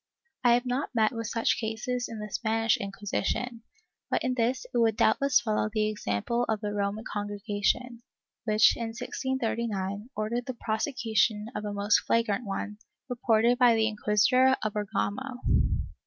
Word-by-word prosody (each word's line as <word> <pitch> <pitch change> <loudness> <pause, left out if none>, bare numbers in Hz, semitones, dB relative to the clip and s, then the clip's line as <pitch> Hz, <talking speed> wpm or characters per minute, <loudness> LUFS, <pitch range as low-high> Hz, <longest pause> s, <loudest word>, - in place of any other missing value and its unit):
I 240 -1 +6
have 245 +1 -1
not 255 +1 -2
met 220 -1 +3
with 230 -2 -4
such 230 0 +1
cases 235 +3 -3
in 225 - -6
the 210 -1 -7
Spanish 225 0 +1
Inquisi 200 0 -3
tion, 240 +3 -2 0.5
but - - 0
in 255 - 0
this 250 +1 0
it 240 - +2
would 225 -2 +3
doubtless 275 +4 +4
follow 215 -1 0
the 215 -1 +1
example 210 - -1
of 220 -1 +1
the 205 -1 -3
Roman 205 +1 -2
Congregation, 205 +4 -2 0.4
which, 215 0 +5
in 230 - -3
1639, 225 -5 -3
ordered 230 +3 -2
the 255 - -4
prosecution 220 - 0
of 210 - -4
a 205 - -3
most 205 +1 +3
flagrant 230 0 0
one, 205 +2 -4 0.3
reported 240 0 +2
by 245 -2 +6
the 220 0 +2
Inquisitor 225 +5 +3
of 215 -1 -1
Bergamo. 210 +5 -2
220 Hz, 155 wpm, -28 LUFS, 210-245 Hz, 0.5 s, I